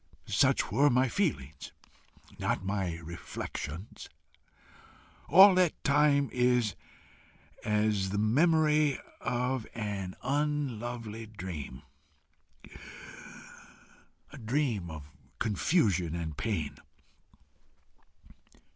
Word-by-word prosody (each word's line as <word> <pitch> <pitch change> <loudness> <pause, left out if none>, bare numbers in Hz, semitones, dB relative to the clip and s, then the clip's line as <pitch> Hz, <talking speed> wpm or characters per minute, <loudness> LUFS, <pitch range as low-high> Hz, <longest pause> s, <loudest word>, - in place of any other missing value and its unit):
Such - - +2
were 145 +1 +4
my 130 0 +3
feelings, 80 - -2 0.7
not 95 - -1
my 95 -4 -1
reflections. 85 +1 -7 1.2
All 190 +4 +9
that 180 -3 +1
time 145 -1 +3
is 125 -4 +2 0.9
as 105 -2 +1
the 100 - -2
memory 150 +5 +3 0.2
of 125 -1 -2
an 100 -4 -4
unlovely 120 -6 -2
dream 85 -10 -7 2.5
a - - -9
dream 115 - -1
of 75 -3 -8 0.3
confusion 100 - +1
and 80 -3 -4
pain. 85 -9 -3
110 Hz, 75 wpm, -30 LUFS, 95-140 Hz, 2.5 s, All